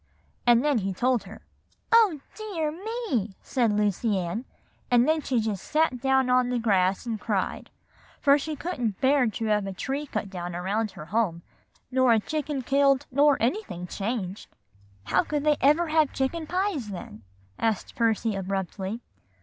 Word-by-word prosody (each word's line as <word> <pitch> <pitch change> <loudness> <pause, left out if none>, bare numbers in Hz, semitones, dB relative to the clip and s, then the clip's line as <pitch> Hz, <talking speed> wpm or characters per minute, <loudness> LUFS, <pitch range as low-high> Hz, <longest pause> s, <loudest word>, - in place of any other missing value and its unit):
And 240 +3 +5
then 290 -5 +3
he 195 -1 -3
told 245 -1 +1
her. 205 +4 -12 0.5
"'Oh, 425 -11 +5
dear 365 -9 -3
me!' 365 - -3
said 240 -5 +1
Lucy 210 0 +1
Ann; 185 +7 -3 0.4
and 245 0 +4
then 315 0 +2
she 260 -4 0
just 215 -4 -2
sat 305 -5 +1
down 265 0 +3
on 250 0 +3
the 250 - 0
grass 195 -4 +1
and 225 -3 -3
cried; 200 -4 -2 0.5
for 285 0 +5
she 310 +2 -4
couldn't 250 - -3
bear 265 -1 +3
to 225 +1 -3
have 210 -2 +1
a 195 - -4
tree 275 +9 -3
cut 210 - -3
down 175 -2 -5
around 205 +5 -1
her 150 - -7
home, 175 -3 -1 0.5
nor 260 -2 +4
a 225 - +4
chicken 290 +2 -3
killed, 275 +1 +3
nor 285 +2 +4
anything 240 - -2
changed." 200 0 -4 0.5
"How 180 - +2
could 295 -1 -2
they 300 -1 +3
ever 305 +5 +4
have 310 -2 +2
chicken 310 +4 -2
pies, 365 - -1
then?" 175 - -8 0.4
asked 225 -3 -1
Percy 225 -1 +1
abruptly. 195 +3 -3
245 Hz, 165 wpm, -26 LUFS, 205-290 Hz, 0.5 s, And